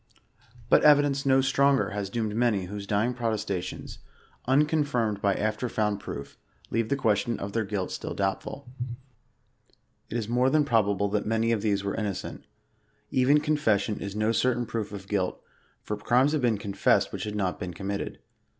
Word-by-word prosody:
But -, -, +5 dB
evidence 145 Hz, -2 st, +4 dB
no 135 Hz, 0 st, +5 dB
stronger 140 Hz, 0 st, +3 dB
has 100 Hz, -1 st, -3 dB
doomed 110 Hz, -1 st, -2 dB
many 110 Hz, -5 st, +1 dB
whose 100 Hz, +2 st, -7 dB
dying 110 Hz, +4 st, +1 dB
protesta 110 Hz, -6 st, -1 dB
tions, -, -, -8 dB, 0.5 s
unconfirmed 135 Hz, -7 st, +2 dB
by 100 Hz, -1 st, +2 dB
after 110 Hz, +3 st, -1 dB
found 105 Hz, -2 st, 0 dB
proof, 70 Hz, -6 st, -8 dB, 0.3 s
leave 115 Hz, -1 st, 0 dB
the -, -, +2 dB
question 115 Hz, -3 st, +1 dB
of 100 Hz, 0 st, -5 dB
their 110 Hz, -3 st, -1 dB
guih 95 Hz, -2 st, -2 dB
still -, -, -5 dB
doubtful. 100 Hz, +7 st, -3 dB, 1.4 s
It 115 Hz, -, -2 dB
is 110 Hz, -3 st, -3 dB
more 125 Hz, +3 st, +2 dB
than 150 Hz, +1 st, +3 dB
probable 100 Hz, -6 st, +2 dB
that 105 Hz, +1 st, -1 dB
many 115 Hz, +1 st, +1 dB
of 110 Hz, -3 st, +1 dB
these 100 Hz, -2 st, 0 dB
were 100 Hz, -, -2 dB
innocent. 100 Hz, -4 st, -4 dB, 0.7 s
Even 135 Hz, +3 st, +4 dB
confession 110 Hz, -9 st, +1 dB
is 100 Hz, 0 st, -5 dB
no 110 Hz, +1 st, +1 dB
certain 120 Hz, 0 st, +1 dB
proof 110 Hz, -3 st, -4 dB
of 100 Hz, -2 st, -8 dB
guilt, 95 Hz, -3 st, -1 dB, 0.4 s
for 105 Hz, -, -3 dB
crimes 125 Hz, +7 st, +3 dB
have 155 Hz, -2 st, 0 dB
been 120 Hz, -4 st, +2 dB
confessed 100 Hz, -1 st, +1 dB
which -, -, -4 dB
had 105 Hz, 0 st, -4 dB
not 95 Hz, -3 st, -1 dB
been 90 Hz, -, -4 dB
committed. 100 Hz, +3 st, -4 dB
110 Hz, 170 wpm, -27 LUFS, 100-125 Hz, 1.4 s, But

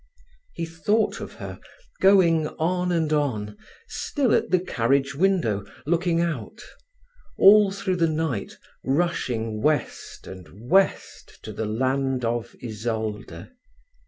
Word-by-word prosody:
He 170 Hz, -, -3 dB
thought 165 Hz, +7 st, 0 dB
of -, -, -7 dB
her -, -, -8 dB, 0.4 s
going 175 Hz, -5 st, +4 dB
on 180 Hz, +3 st, -1 dB
and 160 Hz, -3 st, 0 dB
on, 110 Hz, -9 st, -1 dB, 0.3 s
still 285 Hz, -, -1 dB
at -, -, +1 dB
the 185 Hz, -, +3 dB
carriage 140 Hz, -3 st, 0 dB
window 150 Hz, -, +1 dB, 0.2 s
looking 170 Hz, +1 st, +1 dB
out; 165 Hz, -, -3 dB, 0.8 s
all 205 Hz, +1 st, +7 dB
through 190 Hz, -1 st, -2 dB
the 165 Hz, -1 st, +2 dB
night 155 Hz, -9 st, -3 dB, 0.3 s
rushing 125 Hz, -8 st, -1 dB
west 150 Hz, +1 st, -2 dB
and 95 Hz, +4 st, -12 dB
west 195 Hz, +1 st, +1 dB
to -, -, -7 dB
the 110 Hz, -, -3 dB
land 130 Hz, +2 st, 0 dB
of 115 Hz, 0 st, -3 dB
Isolde. 110 Hz, -2 st, -5 dB
150 Hz, 120 wpm, -24 LUFS, 115-180 Hz, 0.8 s, all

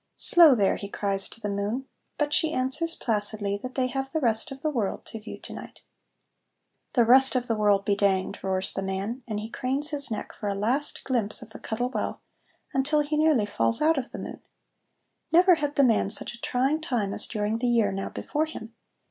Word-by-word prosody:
"Slow, 330 Hz, -6 st, +7 dB
there!" 200 Hz, -4 st, +2 dB
he 200 Hz, -, -7 dB
cries 195 Hz, -1 st, -1 dB
to -, -, -11 dB
the 210 Hz, -, -4 dB
moon, 205 Hz, +6 st, -2 dB, 0.3 s
but 295 Hz, 0 st, 0 dB
she 320 Hz, +1 st, +2 dB
answers 270 Hz, +6 st, 0 dB
placidly 205 Hz, -2 st, -1 dB
that 255 Hz, 0 st, -7 dB
they 260 Hz, -, +1 dB
have 270 Hz, +1 st, -3 dB
the 320 Hz, -, 0 dB
rest 235 Hz, +2 st, 0 dB
of 270 Hz, +1 st, -9 dB
the 310 Hz, -, +1 dB
world 225 Hz, -8 st, -2 dB
to 225 Hz, -, -7 dB
view 215 Hz, -, -9 dB
to -, -, -8 dB
night. -, -, -10 dB, 1.1 s
"The 240 Hz, -, +4 dB
rest 260 Hz, +3 st, +6 dB
of 250 Hz, -1 st, +1 dB
the 230 Hz, -, 0 dB
world 205 Hz, -2 st, +2 dB
be 200 Hz, -, +2 dB
danged!" 195 Hz, -2 st, 0 dB
roars 190 Hz, 0 st, 0 dB
the -, -, -3 dB
man, 195 Hz, +6 st, -3 dB
and 215 Hz, -2 st, -3 dB
he 215 Hz, -, -5 dB
cranes 270 Hz, +6 st, -1 dB
his 285 Hz, -2 st, -1 dB
neck 220 Hz, -, -5 dB
for 210 Hz, -, -6 dB
a 200 Hz, -, -1 dB
last 245 Hz, +9 st, -1 dB
glimpse 230 Hz, -6 st, 0 dB
of 220 Hz, -, -14 dB
the -, -, -10 dB
Cuttle 245 Hz, +3 st, -3 dB
Well, -, -, -3 dB, 0.5 s
until 290 Hz, +3 st, +2 dB
he 295 Hz, +1 st, -2 dB
nearly 300 Hz, -8 st, +3 dB
falls 115 Hz, -, +1 dB
out 310 Hz, -1 st, +3 dB
of 255 Hz, -, -6 dB
the -, -, -8 dB
moon. -, -, -7 dB, 0.9 s
Never 360 Hz, +3 st, +6 dB
had 295 Hz, -3 st, -1 dB
the 280 Hz, -, +4 dB
man 225 Hz, -5 st, +3 dB
such 220 Hz, -, 0 dB
a 235 Hz, -, -13 dB
trying 270 Hz, +5 st, 0 dB
time 235 Hz, -10 st, -1 dB
as -, -, -2 dB
during 215 Hz, 0 st, -2 dB
the 245 Hz, -, 0 dB
year 230 Hz, -4 st, +3 dB
now 195 Hz, 0 st, -4 dB
before 305 Hz, +2 st, -2 dB
him. 225 Hz, -7 st, -9 dB
240 Hz, 215 wpm, -26 LUFS, 205-280 Hz, 1.1 s, Slow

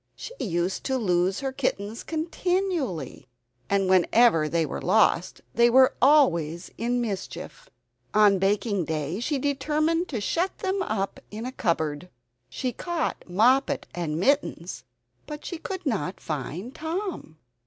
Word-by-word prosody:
She -, -, -8 dB
used 175 Hz, -3 st, -1 dB
to 265 Hz, -1 st, 0 dB
lose 185 Hz, -2 st, +1 dB
her 270 Hz, -1 st, -2 dB
kittens 225 Hz, -5 st, -2 dB
continually, 325 Hz, -, -2 dB, 0.4 s
and 195 Hz, -1 st, +2 dB
whenever 185 Hz, -2 st, +4 dB
they 165 Hz, 0 st, +1 dB
were -, -, -5 dB
lost 190 Hz, -2 st, +2 dB
they 235 Hz, +1 st, +5 dB
were 260 Hz, +2 st, +6 dB
always 175 Hz, -, +3 dB
in 240 Hz, +2 st, -1 dB
mischief! 235 Hz, -, -6 dB, 0.4 s
On 205 Hz, -2 st, +5 dB
baking 200 Hz, -1 st, +1 dB
day 155 Hz, +4 st, -2 dB
she 280 Hz, +5 st, -1 dB
determined 305 Hz, +5 st, 0 dB
to 245 Hz, -, -3 dB
shut 340 Hz, -, -1 dB
them 385 Hz, -1 st, -1 dB
up 200 Hz, -, -2 dB
in 220 Hz, +3 st, -6 dB
a 255 Hz, -, -4 dB
cupboard. 165 Hz, -, -1 dB, 0.4 s
She 255 Hz, -2 st, -3 dB
caught 340 Hz, -, -3 dB
Moppet 245 Hz, +9 st, +3 dB
and 165 Hz, -3 st, -2 dB
Mittens, 190 Hz, -, 0 dB, 0.4 s
but 300 Hz, 0 st, -7 dB
she 345 Hz, -, -5 dB
could 375 Hz, 0 st, -6 dB
not 200 Hz, -7 st, -2 dB
find 160 Hz, -, -5 dB
Tom. 325 Hz, -, -5 dB
225 Hz, 135 wpm, -26 LUFS, 180-295 Hz, 0.4 s, were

